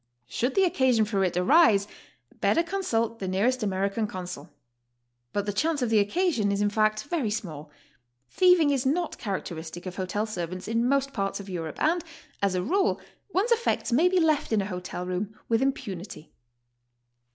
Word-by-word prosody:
Should 245 - -2
the 390 - +4
occasion 260 - +3
for 200 -2 0
it 180 -1 0
arise, 205 - +5 0.5
better 335 - +3
consult 230 - -1
the 190 - -4
near 190 +3 +1
est 255 0 +1
American 200 +2 -1
consul. 180 -6 -7 0.8
But 205 -1 -1
the 205 - -2
chance 300 +6 0
of 235 - -1
the 220 - +5
occasion 225 - +1
is 200 - 0
in 205 0 +1
fact 215 0 +1
very 290 -7 -1
small. 160 -9 -5 0.6
Thieving 360 - +4
is 270 -3 +1
not 320 +5 -1
characteristic 175 -4 -5
of 180 -1 -6
hotel 195 +3 -1
ser 180 -6 -4
vants 180 +2 -7
in 230 +2 +1
most 275 0 +1
parts 195 -3 -2
of 200 0 -9
Europe, 165 -4 -5
and, 335 +3 +2 0.4
as 200 -2 +1
a 180 - 0
rule, 380 - +1 0.3
one's 400 +7 +1
effects 470 - +1
may 315 +10 +4
be 370 0 +2
left 310 -4 +2
in 215 -2 +3
a - - -4
hotel 180 -2 -5
room 190 +4 -4
with 230 +1 +2
impunity. 200 - -4
215 Hz, 180 wpm, -27 LUFS, 190-285 Hz, 0.8 s, arise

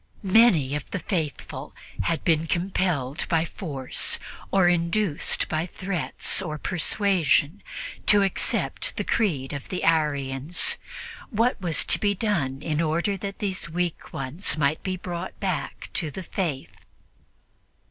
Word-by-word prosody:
Many 185 - +5
of 150 - -5
the - - -2
faithful 165 -5 -4 0.3
had 165 -1 0
been 165 -1 +2
compelled 170 -6 -1
by 165 -1 +2
force 140 -7 0 0.3
or 190 -2 +4
induced 175 0 +2
by 160 +2 -1
threats 180 0 0
or 155 -5 -4
persuasion 180 -1 +2 0.5
to 205 -1 +6
accept 195 - 0
the - - 0
creed 150 - 0
of 140 - -6
the 185 - -3
Arians; 145 0 +2 0.5
what 230 -1 +1
was 170 -4 +2
to - - +4
be 205 -1 +1
done 155 - -1
in 155 -1 0
order 170 +5 +1
that 195 +1 -5
these 190 -4 -2
weak 175 0 -2
ones 150 +2 -1
might 145 0 +1
be 185 -1 -2
brought 175 0 -6
back 180 -8 -3
to 160 - +1
the 185 +6 -7
Faith? 165 -7 -3
170 Hz, 135 wpm, -25 LUFS, 150-190 Hz, 0.5 s, to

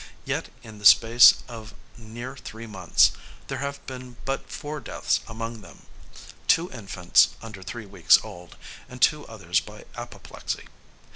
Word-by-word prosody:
Yet, - - -3
in 110 -2 -12
the 105 - -10
space 115 +3 +7
of 110 -2 -10 0.2
near 120 +3 -8
three 115 -3 -9
months, 95 -6 +3 0.4
there - - -3
have 140 0 -5
been 125 -2 -9
but 135 0 -3
four 150 +1 -6
deaths - - -1
among 115 0 -6
them; - - -16 0.6
two 170 +2 +3
infants 100 -6 +2
under 110 -4 -10
three 110 +5 -7
weeks 95 -4 +5
old, 90 0 -11 0.3
and 125 -1 -10
two 150 +2 +2
others 95 -4 -1
by 105 0 -12
apoplexy. 120 0 -7
115 Hz, 145 wpm, -25 LUFS, 105-125 Hz, 0.6 s, space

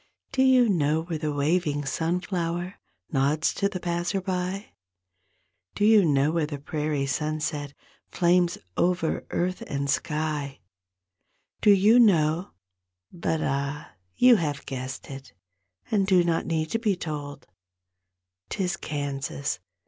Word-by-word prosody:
Do 260 - +1
you 260 -2 +5
know 160 -5 +1
where 165 -2 -4
the 155 -1 -2
waving 145 0 0
sunflower 175 +3 -2 0.3
Nods 145 +4 +1
to 200 - 0
the 185 - -5
passer 175 +3 -1
by; 185 +2 -3 1.0
Do 205 - +1
you 215 -2 +6
know 145 -1 +3
where 165 -2 0
the 145 -1 -5
prairie 150 0 -2
sunset 150 0 -2 0.3
Flames 175 0 +2 0.2
over 175 -2 0
earth 185 +1 -1
and 140 -1 -2
sky; 150 -3 -2 1.0
Do - - +4
you 205 +4 +6
know—but 155 - 0
ah, 140 +2 -2 0.2
you 250 -2 +6
have 145 -5 -3
guessed 130 +1 -6
it 135 0 -10 0.6
And 200 -3 +2
do 185 -2 +5
not 170 -1 0
need 160 -1 -1
to 225 - 0
be 215 -4 +1
told; 145 -4 -6 1.0
'Tis 180 -3 -2
Kansas! 140 - -3
160 Hz, 125 wpm, -26 LUFS, 145-180 Hz, 1.0 s, you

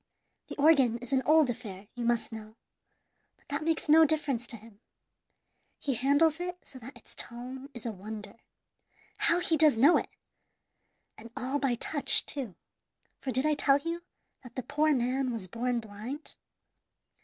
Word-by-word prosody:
The - - -7
organ 280 -6 +4
is 245 +2 -7
an 265 - +3
old 310 -4 +5
affair, 205 -5 -9
you 240 -1 -4
must 235 0 0
know; 220 -1 -9 0.8
but - - -32
that 285 +2 -2
makes 325 0 -1
no 315 +2 +7
difference 285 -6 0
to 230 - -6
him. 215 -1 -17 1.0
He 275 - -2
handles 285 +6 +3
it 360 0 -4
so 260 - -10
that 250 +2 -11
its 240 - -14
tone 255 +3 -6
is 240 - -9
a 230 - -1
wonder. 210 +1 -8 0.8
How 340 - +3
he 330 - +2
does 300 -6 +5
know 285 +9 +6
it! - - -3 1.1
and 230 +2 -11
all 265 +3 -1
by 270 -4 +1
touch, 285 +4 +3
too, 255 -10 -5 0.6
for 270 - -5
did 260 +3 +1
I 305 - +3
tell 280 -1 +4
you 335 +4 -4 0.4
that 245 -2 -14
the 255 - -3
poor 305 +4 +1
man 255 0 0
was 220 -6 -4
born 240 +5 -1
blind? 225 +7 -7
260 Hz, 165 wpm, -29 LUFS, 230-295 Hz, 1.1 s, no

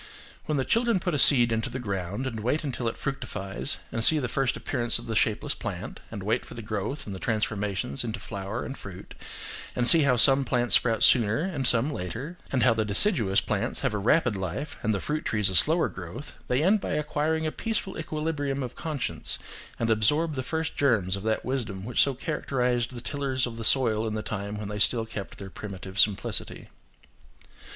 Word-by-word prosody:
When 150 - -1
the 135 - 0
children 230 -3 +2
put 180 -1 -2
a 145 - 0
seed 125 -4 +8
into 110 0 -1
the - - -5
ground, 100 0 -4
and 115 -4 -4
wait 125 +9 -1
until 130 -4 -3
it 115 - -3
fructifies, 100 -8 -3
and 115 - -2
see 155 - +6
the 130 -4 -1
first 135 +1 0
appearance 120 -1 -1
of - - -8
the 110 - -4
shapeless 110 -2 +1
plant, - - -6
and - - -7
wait - - 0
for - - -11
the 115 - -7
growth 110 +6 -4
and 100 - -6
the 95 - -7
transformations 105 - -2
into 115 -1 -4
flower 100 0 -5
and 135 - -6
fruit, 95 -2 -10 0.6
and 120 -1 +2
see 165 +3 +9
how 140 -3 +3
some 135 +3 +6
plants 120 -1 0
sprout 115 -2 +3
sooner 115 0 +5
and 150 -9 -2
some 125 +5 +2
later, 125 - -5 0.2
and 130 - +1
how 125 - +5
the 110 -1 0
deciduous 105 - +3
plants 110 +3 -2
have 135 -5 0
a 105 - -1
rapid 120 +2 +2
life, 95 - -4
and 110 - 0
the 100 - 0
fruit 150 +9 -3
trees 105 -3 +1
a - - -3
slower 160 - +4
growth, 90 - -8
they 125 +4 +1
end 200 +4 +3
by - - -3
acquiring 150 +1 -1
a 155 - -1
peaceful 215 -2 -3
equilibrium 150 -3 -3
of 125 -1 -6
conscience, 130 - -2 0.4
and 115 -1 0
absorb 150 +10 +3
the 130 - -3
first 160 +4 -3
germs 110 -10 +2
of 100 - -6
that 110 +1 -1
wisdom 115 -7 -3
which 125 - +2
so 140 -2 +2
characterised 125 -4 -1
the 120 - -5
tillers 135 -1 -1
of 120 -2 -6
the 115 - -6
soil 115 -2 +3
in 110 - -3
the 110 - -3
time 100 0 -4
when 105 -1 -5
they 105 0 -5
still 115 +2 +2
kept 105 -3 -7
their 95 -1 -9
primitive 95 -1 -7
simplicity. 105 -3 +1
120 Hz, 210 wpm, -27 LUFS, 105-140 Hz, 0.6 s, see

